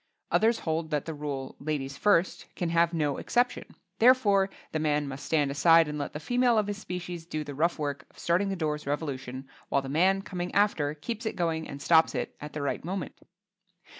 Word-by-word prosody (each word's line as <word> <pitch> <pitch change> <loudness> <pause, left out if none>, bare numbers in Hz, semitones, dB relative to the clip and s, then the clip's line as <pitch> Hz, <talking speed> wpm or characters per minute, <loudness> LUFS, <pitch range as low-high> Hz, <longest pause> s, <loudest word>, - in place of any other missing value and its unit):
Others 225 +1 +3
hold 160 0 -2
that 150 -2 -1
the 160 - -4
rule 145 -3 -5
"Ladies 140 -2 -3
first" 185 +2 +2
can 175 - -2
have 170 0 +3
no 150 -4 0
exception, 245 +1 0 0.3
therefore 210 -6 +5 0.2
the 155 - -1
man 150 -1 +1
must 135 0 -7
stand 145 -3 +1
aside 165 +3 +5
and 150 0 -4
let 145 - -4
the 150 - -4
female 245 +6 +2
of 215 - +3
his 205 0 -4
species 180 -3 -6
do 155 -2 -4
the 145 - -7
rough 165 +5 +1
work 145 -2 -4
of - - -25
starting 180 +4 +1
the 195 - -1
door's 150 -4 -2
revolution 135 -3 -4 0.2
while 140 - +1
the 135 - -6
man, 190 +6 +3
coming 180 -3 -4
after, 160 -8 +2
keeps 225 +9 -5
it - - -3
going 165 -2 -1
and 140 0 -8
stops 160 +2 +4
it - - -3
at 150 +1 -7
the 150 - -3
right 140 - -2
moment. 185 +3 -4
160 Hz, 205 wpm, -28 LUFS, 145-190 Hz, 0.3 s, therefore